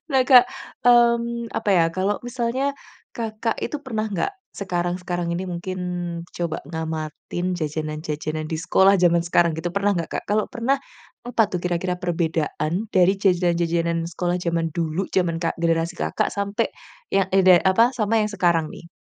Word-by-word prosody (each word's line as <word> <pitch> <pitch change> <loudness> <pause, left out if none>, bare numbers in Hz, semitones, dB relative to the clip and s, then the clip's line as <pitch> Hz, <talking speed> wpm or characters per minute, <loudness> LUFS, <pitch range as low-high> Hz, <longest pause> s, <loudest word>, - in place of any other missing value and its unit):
Nah 265 -1 +4
Kak, 250 -2 +9 0.4
mmm, 235 -1 +3
apa 205 - 0
ya, 175 -3 +5
kalau 195 +2 0
misalnya, 255 +3 -1 0.4
Kakak 225 0 -3
itu 295 - -2
pernah 220 -4 -2
nggak, 200 - -2 0.2
sekarang 175 -2 -2
sekarang 175 -1 -3
ini 175 +2 -2
mungkin, 185 +1 -5 0.6
coba 170 -2 -2
ngamatin 160 +2 -4
jajanan-jajanan 155 -1 -4
di 160 - -2
sekolah, 190 +4 +4
jaman 170 -1 +4
sekarang 170 -1 +2
gitu, 160 +2 -3
pernah 200 +1 +1
nggak 170 - -3
Kak? - - -3
Kalau 210 0 +2
pernah, 245 +4 +1 0.5
apa 240 -1 +1
tuh 180 - -1
kira-kira 180 +1 -1
perbedaan 165 -2 -1 0.2
dari 185 -1 +4
jajanan-jajanan 170 -3 +1
sekolah 175 +1 -1
jaman 170 -1 0
dulu, 170 +2 -1
jaman 175 -3 +1
Kak 165 -1 -1
generasi 165 0 +1
Kakak, - - -1
sampai 200 +3 -1 0.4
yang 195 -1 +2
ide 185 -2 +6
apa, 225 +6 +4
sama 225 -1 +1
yang 210 - -3
sekarang, 170 -5 +2
nih? 170 - -12
180 Hz, 155 wpm, -23 LUFS, 170-210 Hz, 0.6 s, Kak